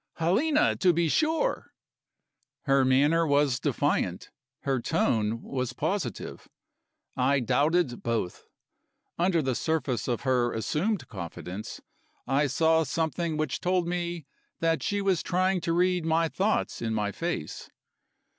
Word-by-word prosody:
"Helena, 245 - +2
to 180 -2 +4
be 170 0 +1
sure!" 320 - 0 0.9
Her 135 -2 +3
manner 145 +6 +3
was 140 -3 +2
defiant, - - -1 0.3
her 135 -3 -1
tone 110 -1 0
was 130 -2 -3
positive; - - -3 0.7
I 135 +2 +2
doubted 140 +3 +1
both. 115 -6 -3 0.7
Under 170 -2 +2
the 130 -1 0
surface 135 -5 -1
of 120 -3 -1
her 125 -3 +1
assumed 175 - -1
confidence, 95 +1 -7 0.4
I 140 +3 +2
saw 160 +4 +3
something 160 +2 -2
which 155 0 -1
told 180 -1 +1
me 175 -3 -3 0.3
that 165 -3 +1
she 205 +8 -1
was 190 -4 +2
trying 185 0 +1
to 165 - -1
read 180 0 +2
my 165 +1 +2
thoughts 205 +6 -1
in 110 -1 -1
my 105 -1 -1
face. 170 - -4
155 Hz, 125 wpm, -27 LUFS, 125-175 Hz, 0.9 s, to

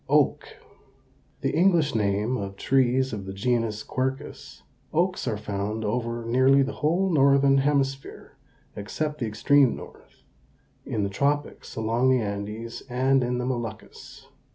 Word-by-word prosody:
OAK. - - +1 0.9
The - - 0
English 170 -4 +3
name 105 +3 0
of 100 -4 -5
trees 130 +2 +1
of 100 -3 -5
the 95 - -5
genus 115 0 -1
Quercus. 130 +1 -5 0.3
Oaks 180 +3 0
are 105 - -1
found 105 +1 -4
over 115 +1 -2
nearly 130 +3 +4
the 140 +1 -4
whole 180 +5 +1
northern 140 -2 +4
hemisphere, 135 -1 -2 0.4
except 150 +9 -4
the 120 - -1
extreme 130 +5 +3
north; - - -14 0.6
in 105 - -1
the 100 - -1
tropics 145 +7 -2
along 115 +3 +1
the 130 - +4
Andes, 105 +2 -5
and 130 +2 +2
in 125 0 -1
the 125 - -2
Moluccas. 120 -4 -6
125 Hz, 135 wpm, -25 LUFS, 110-140 Hz, 0.9 s, nearly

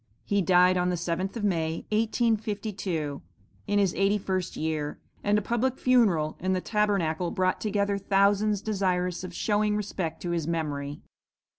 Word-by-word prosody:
"He 200 -1 +1
died 180 +1 +5
on 180 0 +1
the 180 - 0
7th 175 +4 -2
of 230 - -4
May, 165 -5 -1
1852, 210 - -1 0.5
in 205 - +1
his 195 -3 +3
eighty 195 +2 +2
first 185 -2 -3
year, 155 -2 -2 0.3
and 205 +1 +3
a 210 - -1
public 240 +4 0
funeral 200 -12 +3
in 185 +1 0
the 185 - +1
Tabernacle 185 -5 0
brought 185 +1 0
together 200 -1 0
thousands 200 +1 +2
desirous 185 -4 -1
of 185 - -6
showing 210 +1 +1
respect 185 -6 -3
to 175 - -2
his 165 -3 -1
memory." 145 -4 -3
190 Hz, 155 wpm, -27 LUFS, 170-210 Hz, 0.5 s, died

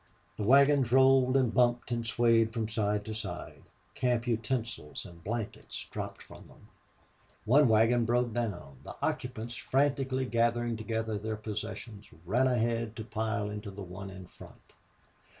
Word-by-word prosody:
The - - -6
wagons 135 +2 +5
rolled 130 0 +5
and 125 -4 +2
bumped 120 0 +2
and 120 -1 -1
swayed 115 -1 +3
from 115 -3 -1
side 105 -1 -1
to 110 - -4
side; 110 - -6 0.2
camp 125 -2 0
utensils 115 - -3
and 85 -1 -13
blankets 115 +2 -5
dropped - - -6
from - - -13
them. - - -19 0.8
One 135 +6 +5
wagon 115 +2 +4
broke 120 0 +1
down. 100 - -4
The - - -9
occupants, 120 -2 -3
frantically 135 +1 0
gathering 120 0 +1
together 110 -1 -2
their 110 +1 -3
possessions, 105 0 -6 0.2
ran 120 +8 +2
ahead 115 -2 0
to 110 - -5
pile 110 -1 -2
into 105 0 -6
the 100 0 -8
one 95 +2 -8
in 95 -1 -10
front. - - -16
115 Hz, 150 wpm, -30 LUFS, 105-125 Hz, 0.8 s, wagons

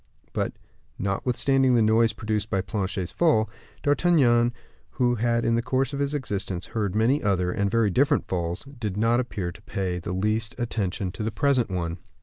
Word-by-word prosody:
But, - - -1 0.4
notwithstanding 125 +6 +2
the 115 - +4
noise 110 +1 +4
produced 110 -1 -2
by 95 -3 +1
Planchet's 95 -2 -3
fall, 150 -11 +3 0.4
D'Artagnan, 140 -6 +4 0.4
who 120 -1 +2
had 115 0 +1
in 115 - +2
the 115 - +2
course 130 +2 0
of 140 - -3
his 140 +1 0
existence 100 -8 -3
heard 105 -4 -2
many 120 +7 +3
other, 90 -3 +1
and 100 +2 0
very 115 -1 +2
different 145 - +2
falls, 85 -1 -2
did 120 -8 -5
not 115 +3 +3
appear 100 -8 -3
to 105 - -15
pay 95 -3 -3
the 85 - -5
least 110 +4 0
attention 100 -6 -2
to 105 - -8
the 110 - 0
present 130 -2 +1
one. 85 -2 -3
110 Hz, 175 wpm, -25 LUFS, 95-125 Hz, 0.4 s, the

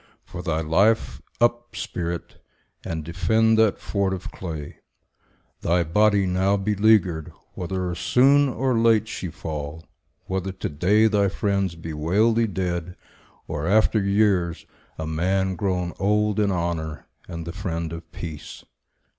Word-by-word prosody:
For 90 - -7
thy 80 -3 -1
life, 100 +8 +2 0.2
Up, 120 0 +1
spirit, 85 -1 -5 0.4
and 80 -2 -4
defend 110 +7 +2
that 110 -3 +4
fort 100 -2 -1
of 90 - -8
clay, 80 -5 -7 0.8
Thy 85 +1 +2
body, 100 +4 +3
now 95 +2 +2
beleaguered; 100 -5 +2 0.2
whether 90 0 -3
soon 135 +10 +4
Or 130 0 0
late 115 -1 +3
she 95 - -5
fall; 75 0 -6 0.4
whether 95 0 -2
to - - -4
day 95 +9 +3
thy 105 -2 +3
friends 100 -2 -1
Bewail 85 +8 +1
thee 115 0 +2
dead, 90 -3 -3 0.5
or, 75 +2 -3
after 110 +2 +3
years, 100 -4 +1 0.3
a 80 - -4
man 95 +4 0
Grown 90 -1 -1
old 105 +1 +1
in 100 -2 +2
honour 85 -3 -3 0.2
and 85 -2 -6
the 85 - -6
friend 85 -4 -4
of 80 -1 -9
peace. 80 -4 -8
95 Hz, 135 wpm, -24 LUFS, 85-105 Hz, 0.8 s, that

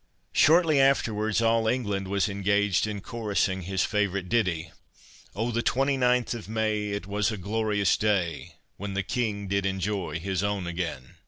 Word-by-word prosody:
Shortly 160 -2 +5
afterwards, 110 -5 +2
all 115 0 +3
England 105 -6 -1
was 100 +2 +1
engaged 100 0 +1
in 105 -2 -4
chorusing 100 -4 -1
his 95 +1 -1
favourite 100 -3 -1
ditty— 90 -8 0 0.6
"Oh, 115 +4 -1
the 115 0 0
twenty 135 +3 +1
ninth 125 -2 +2
of 115 -3 -8
May, 110 -1 0
It 100 -2 -3
was 105 +3 0
a 110 - -4
glorious 105 0 +1
day, 90 -5 -1 0.2
When 100 0 -5
the 100 - 0
King 105 -2 -2
did 100 0 0
enjoy 95 -2 -2
his 95 +1 -2
own 100 -2 -1
again." 85 -7 -5
105 Hz, 160 wpm, -27 LUFS, 95-115 Hz, 0.6 s, Shortly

